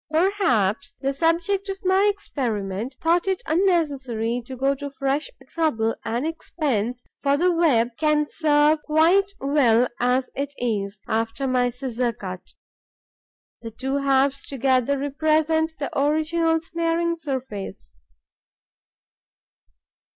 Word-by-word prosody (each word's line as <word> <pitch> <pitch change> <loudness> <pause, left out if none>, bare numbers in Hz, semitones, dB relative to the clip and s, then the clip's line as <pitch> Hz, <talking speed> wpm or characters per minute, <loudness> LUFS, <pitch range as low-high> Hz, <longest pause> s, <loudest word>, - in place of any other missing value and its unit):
Perhaps 310 - +1
the 275 +1 -1
subject 340 +6 0
of 385 - -3
my 380 +2 +4
experiment 230 - -4
thought 340 +3 +2
it 380 -1 -1
unnecessary 280 - 0
to 260 - -7
go 270 +2 +2
to 285 +1 -6
fresh 275 - -2 0.2
trouble 230 -9 0
and 235 +5 -2
expense, 250 -7 -2 0.2
for 280 0 +2
the 360 +4 +3
web 295 -9 +3
can 305 -1 +2
serve 300 0 +3
quite 340 +7 +3
well 255 -4 +3
as 250 +1 +1
it 285 +1 -4
is, 205 -4 -2
after 225 +4 -1
my 250 -1 +2
scissor 250 -1 -2
cut: 185 -3 -8 1.1
the 230 - -6
two 265 +5 -3
halves 275 0 +2
together 265 0 +1
represent 315 +3 +1
the 285 - -5
original 320 +3 +1
snaring 335 0 -1
surface. 260 - -6
280 Hz, 115 wpm, -23 LUFS, 245-325 Hz, 1.1 s, my